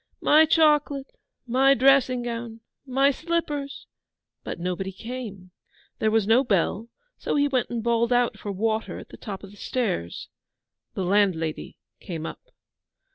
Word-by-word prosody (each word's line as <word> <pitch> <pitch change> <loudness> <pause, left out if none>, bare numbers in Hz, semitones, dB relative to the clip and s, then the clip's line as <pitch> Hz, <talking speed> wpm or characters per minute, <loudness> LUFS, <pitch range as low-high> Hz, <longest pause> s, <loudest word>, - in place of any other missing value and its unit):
My 310 +2 +6
chocolate 295 -3 +2 0.3
my 265 +3 +4
dressing 260 -1 +4
gown 230 -1 -5 0.3
my 270 +2 +3
slippers'; 295 -3 -3 0.6
but - - -6
nobody 180 +2 -3
came. 210 -4 -8 0.5
There 220 - +2
was 220 -2 +2
no 230 +5 +4
bell, 210 0 0 0.3
so - - -2
he 285 0 +3
went 260 -3 0
and 235 -2 -3
bawled 235 0 +1
out 245 -1 +2
for 205 - -5
water 220 +3 -1
on - - -9
the - - -11
top 200 -2 -7
of 195 - -10
the 205 - -16
stairs. 195 - -3 0.7
The 190 - -2
landlady 180 -5 0 0.2
came 165 -3 -6
up. - - -7
235 Hz, 145 wpm, -25 LUFS, 200-270 Hz, 0.7 s, My